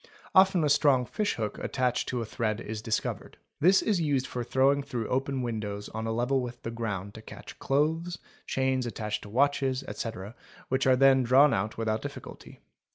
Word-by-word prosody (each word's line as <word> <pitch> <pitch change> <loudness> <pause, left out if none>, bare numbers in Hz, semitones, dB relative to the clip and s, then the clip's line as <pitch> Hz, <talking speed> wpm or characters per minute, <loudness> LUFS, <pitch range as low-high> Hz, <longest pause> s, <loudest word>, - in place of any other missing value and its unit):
Often 190 -3 +5
a 150 - +2
strong 140 -3 +4
fish 210 - -2
hook 110 -2 -4
attached 125 -2 -1
to 125 -2 -2
a - - -5
thread 110 0 -2
is 110 0 -6
discovered. 110 -1 -3 0.2
This 185 +5 +5
is 200 -6 +1
used 140 -4 +1
for 125 - -4
throwing 135 +3 +2
through 125 -5 -4
open 135 0 -1
windows 105 -3 -4
on 110 +1 -5
a - - -1
level 125 +4 +1
with 120 -1 -7
the 115 - -4
ground 105 -4 -4
to 110 - -10
catch - - -11
clothes, 160 +5 0 0.3
chains 130 -1 0
attached 105 -2 -4
to 105 - -11
watches, 135 +2 +1
ete., 110 -2 -6 0.4
which 130 +1 +1
are 130 - +6
then 135 0 +5
drawn 135 +4 +5
out 105 +3 -2
without 110 -1 -1
difficulty. - - -9
125 Hz, 185 wpm, -28 LUFS, 110-140 Hz, 0.4 s, are